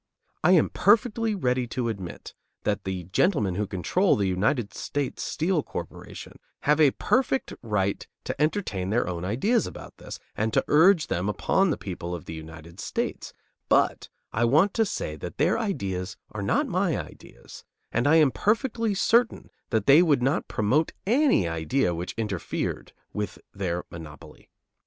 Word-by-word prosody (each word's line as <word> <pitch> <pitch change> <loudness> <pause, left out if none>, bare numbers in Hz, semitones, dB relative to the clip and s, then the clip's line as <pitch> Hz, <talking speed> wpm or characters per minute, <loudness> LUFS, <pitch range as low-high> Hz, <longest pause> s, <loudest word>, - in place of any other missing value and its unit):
I 180 +3 +6
am 170 - +4
perfectly 220 +1 +3
ready 125 -7 0
to 120 0 -2
admit 95 -6 -6 0.3
that - - -1
the 95 -2 -3
gentlemen 100 - +1
who 105 +3 -2
control 135 - +2
the 100 -2 0
United 105 +5 0
States 145 -2 -3
Steel 165 0 0
Corporation - - -8 0.2
have 150 +2 +3
a 150 - +7
perfect 265 +1 +1
right 100 -4 -1 0.2
to - - -4
entertain 150 - 0
their 115 0 +1
own 85 -1 -4
ideas 135 - +1
about - - -10
this - - -8 0.2
and 110 +1 0
to - - +2
urge 165 +2 +5
them 90 +4 -1
upon 190 - +2
the 150 - 0
people 90 -2 -5
of 85 - -9
the - - -7
United 80 +2 -10
States; - - -3 0.4
but - - +2 0.2
I 115 - +1
want 155 - +4
to 225 - +2
say 75 - -4
that 85 +3 -7
their 170 +9 +2
ideas 95 - -3
are - - -5
not - - +1
my - - 0
ideas; - - -11 0.3
and 120 +4 +1
I 155 - +5
am 155 -4 +5
perfectly 225 - 0
certain 235 +5 +2 0.2
that 110 -3 0
they 145 +5 +8
would 145 -8 +3
not 135 +3 +1
promote 130 +10 +1
any 250 - +3
idea 85 +6 0
which 85 +3 -4
interfered 105 -6 -3 0.2
with 105 0 -3 0.2
their 90 -3 -2
monopoly. 75 -3 -11
120 Hz, 160 wpm, -26 LUFS, -, 0.4 s, they